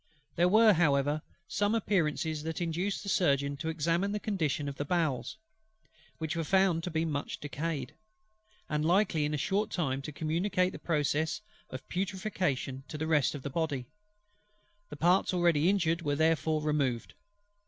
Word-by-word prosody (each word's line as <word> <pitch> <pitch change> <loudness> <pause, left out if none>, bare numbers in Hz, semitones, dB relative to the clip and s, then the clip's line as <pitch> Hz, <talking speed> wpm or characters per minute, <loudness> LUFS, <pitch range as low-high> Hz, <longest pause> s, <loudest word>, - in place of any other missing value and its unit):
There 175 +1 +4
were, 215 +2 +6
however, 145 -3 +2 0.3
some 205 +2 +1
appearances 160 -7 0
that 160 +1 -4
induced 175 +5 -2
the - - -9
Surgeon 140 -6 +2
to 160 +3 -3
examine 170 +5 0
the 210 - -1
condition 160 -8 -1
of 140 - -5
the - - -1
bowels; 155 -5 -1 0.8
which 160 +1 -3
were 165 - -1
found 190 -1 +2
to - - -2
be 160 -1 0
much 145 -3 -3
decayed, 145 -2 -4 0.7
and 150 0 -1
likely 170 -2 +2
in 150 - -2
a - - -1
short 200 +8 0
time 135 -6 -1
to 145 - -6
communicate 180 +5 0
the - - -9
process 155 +3 0 0.3
of 130 0 -8
putrefaction 180 -8 -2
to 155 - -6
the 155 - -2
rest 150 -3 +2
of 140 - -7
the 140 - -4
Body: 145 -5 -1 1.0
the 150 - -8
parts 180 +4 +3
already 170 -2 +3
injured 170 -4 +1
were 145 -3 0
therefore 155 0 +1
removed. 140 -6 0
160 Hz, 165 wpm, -30 LUFS, 145-180 Hz, 1.0 s, were